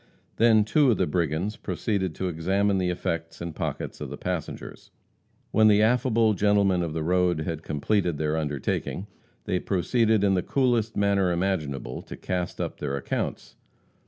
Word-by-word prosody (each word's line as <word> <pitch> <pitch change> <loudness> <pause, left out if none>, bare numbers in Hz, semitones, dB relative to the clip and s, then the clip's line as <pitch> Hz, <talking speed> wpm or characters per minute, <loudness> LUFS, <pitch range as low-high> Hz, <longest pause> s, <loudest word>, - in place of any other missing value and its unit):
Then 115 -2 +5
two 140 +6 +3
of 115 - +3
the - - +2
brigands 85 +6 -1
proceeded 95 -7 -2
to 95 - -2
examine 95 +4 +1
the 90 -1 0
effects 85 -1 -3
and 85 -1 -5
pockets - - -4
of - - -4
the - - -7
passengers. - - -5 0.6
When 110 0 +5
the 105 0 +5
affable 115 -1 +3
gentlemen 100 -2 +3
of 85 -3 -2
the 80 -1 -2
road 90 -1 +2
had 80 0 -3
completed 85 +2 0
their 75 0 0
undertaking, 75 +4 -2 0.4
they 90 - 0
proceeded 110 +3 +1
in 100 -1 +3
the 90 - +2
coolest 120 -2 +1
manner 100 -2 +2
imaginable 75 -9 -2
to - - -10
cast 90 -2 -3
up - - -4
their 70 - -2
accounts. 70 - -4
95 Hz, 160 wpm, -26 LUFS, 80-105 Hz, 0.6 s, Then